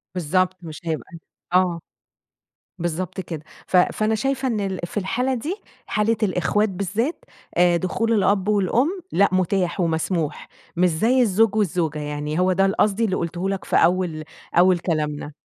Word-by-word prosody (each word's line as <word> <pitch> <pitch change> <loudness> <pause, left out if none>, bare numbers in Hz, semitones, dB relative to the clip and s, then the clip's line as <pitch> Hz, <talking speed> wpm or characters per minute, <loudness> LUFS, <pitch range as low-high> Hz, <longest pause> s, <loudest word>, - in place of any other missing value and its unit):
بالضبط. 185 +2 +1
مش 160 -1 -9
هيبقى 160 -2 -2
ال 165 - -9 0.3
آه، 180 -2 +3 1.0
بالضبط 175 +2 -3
كده. 160 -4 -7 0.2
ف 185 - +3
فأنا 215 +4 +2
شايفة 270 +3 -1
إن 225 -4 0
ال 190 -2 -2
في 175 - -8
الحالة 245 +7 0
دي، 290 - -3 0.3
حالة 220 0 +1
الإخوات 205 +3 +1
بالذات، 205 - -2 0.3
آآ 175 -1 +5
دخول 225 +6 0
الأب 200 -1 +2
والأم، 240 - +1
لأ 200 - +4
متاح 185 0 0
ومسموح، 165 -1 -1 0.3
مش 180 +1 +4
زي 230 +11 +2
الزوج 215 -1 +3
والزوجة. 170 -7 0
يعني 150 +2 -3
هو 185 +1 +3
ده 195 +1 +3
ال 195 - +1
قصدي 215 +2 +2
اللي 190 -3 0
قُلته 175 +3 -2
لك 195 -2 -3
في - - -1
أول 175 -3 +2 0.3
أول 180 0 +5
كلامنا. 150 -3 -2
185 Hz, 160 wpm, -22 LUFS, 170-210 Hz, 1.0 s, آآ